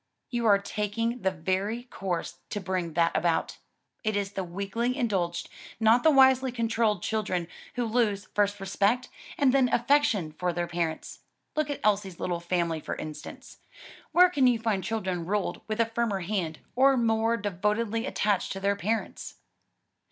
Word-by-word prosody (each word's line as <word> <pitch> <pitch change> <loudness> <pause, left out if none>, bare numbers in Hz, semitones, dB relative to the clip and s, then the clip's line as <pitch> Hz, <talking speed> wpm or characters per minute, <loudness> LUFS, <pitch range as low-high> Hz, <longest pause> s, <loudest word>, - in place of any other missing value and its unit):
"You 235 -2 0
are 200 -2 +7
taking 215 +4 -2
the 190 - +2
very 190 +6 -2
course 185 -8 -4
to 205 - -3
bring 180 -3 -2
that 170 +1 +2
about; 170 -2 0 0.4
it 215 -2 0
is 200 -1 -1
the 195 - -3
weakly 200 +8 -2
indulged, 190 -9 -1 0.3
not 225 +2 +5
the 320 - +5
wisely 265 -2 +5
controlled, 225 -4 0
children 185 -6 -1 0.3
who 245 -1 0
lose, 220 -3 +1
first 205 0 +1
respect, 200 +5 0 0.3
and 270 -3 +3
then 265 -2 +4
affection 235 - +2
for 175 +3 -2
their 175 0 -1
parents. 170 -2 -3 0.4
Look 305 -1 0
at 285 - -4
Elsie's 200 -4 +1
little 175 -1 -2
family 170 -2 -1
for - - -5
instance; 155 -1 -9 0.5
where 360 +1 +6
can 275 -7 +4
you 245 -2 +4
find 220 -4 -1
children 190 -4 -2
ruled 200 +3 -2
with 215 0 -3
a 230 - +5
firmer 225 -3 -1
hand, 175 -4 -3
or 270 +1 +5
more 225 0 +2
devotedly 210 +4 -1
attached 205 -7 0
to 195 - -5
their 200 +1 +1
parents?" 215 +3 -3
210 Hz, 160 wpm, -28 LUFS, 185-235 Hz, 0.5 s, are